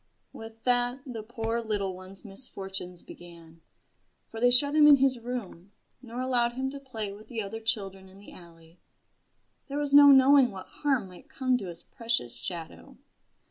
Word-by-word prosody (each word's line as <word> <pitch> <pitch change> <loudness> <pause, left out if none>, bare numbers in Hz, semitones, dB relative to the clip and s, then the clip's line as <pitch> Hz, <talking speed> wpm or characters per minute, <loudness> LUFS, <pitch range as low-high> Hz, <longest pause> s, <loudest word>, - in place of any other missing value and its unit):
With 225 0 -12
that 245 +1 +1
the 240 -5 -7
poor 225 +1 -4
little 205 -4 -3
one's 185 +3 -13
misfortunes 195 -4 -6
began. 165 -1 -15 0.7
For 225 - -8
they 245 +1 +4
shut 280 +4 +8
him 300 -1 +6
in 295 - +9
his 265 -2 +1
room, 220 -6 -8 0.3
nor 245 0 -7
allowed 245 -2 +1
him 265 +2 -4
to 280 - -5
play 225 -7 -6
with 210 +2 -14
the 230 -4 -5
other 210 +3 -7
children 195 -4 -4
in 190 - -17
the 200 - -15
alley 165 -1 -17 0.9
there 280 0 -5
was 290 -1 -3
no 285 0 +9
knowing 270 -1 +6
what 190 -3 -10
harm 275 -8 -2
might 185 - -16
come 260 -4 -1
to 195 - -7
his 170 -1 -10
precious 230 - -3
shadow. 170 -3 -9
225 Hz, 175 wpm, -27 LUFS, 190-255 Hz, 0.9 s, in